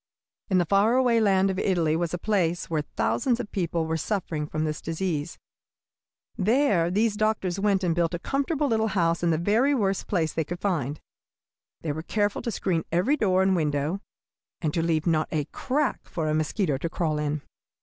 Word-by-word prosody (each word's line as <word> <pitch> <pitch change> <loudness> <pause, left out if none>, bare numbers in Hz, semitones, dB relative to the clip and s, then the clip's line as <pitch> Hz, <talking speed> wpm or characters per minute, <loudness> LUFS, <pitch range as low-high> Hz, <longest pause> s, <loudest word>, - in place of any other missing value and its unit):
In 190 - +3
the 175 - +3
faraway 230 +6 +3
land 195 -2 +3
of 190 - -3
Italy 170 -6 +1
was 170 0 -1
a 175 - -2
place 175 -4 0
where 155 -2 +1
thousands 240 - 0
of 225 -4 -5
people 170 -3 -1
were 160 0 -1
suffering 160 -4 -2
from 155 +1 -2
this 155 -1 -3
disease. 165 -2 -3 1.0
There 205 -5 +3
these 210 +3 +1
doctors 210 -4 0
went 195 -1 +2
and 175 -2 +2
built 170 0 0
a - - -1
comfortable 280 - -1
little 220 -4 +1
house 170 -5 +1
in 170 - +2
the 160 - +2
very 225 - +2
worst 195 -5 0
place 165 -5 0
they 160 - 0
could 175 +3 -6
find. 155 -8 -1 0.8
They 155 - -2
were 155 +2 -4
careful 205 +4 -1
to - - -3
screen 175 -5 -1
every 185 - +2
door 190 -8 +2
and 190 0 +3
window, 150 +3 -1 0.6
and 155 -3 -1
to 165 - +1
leave 160 -2 0
not 160 -2 +2
a 150 -3 0
crack 275 +1 -1
for 160 -2 -2
a 155 - +1
mosquito 155 -1 0
to 170 - -2
crawl 155 -3 -1
in. 150 0 -2
175 Hz, 190 wpm, -26 LUFS, 160-205 Hz, 1.0 s, In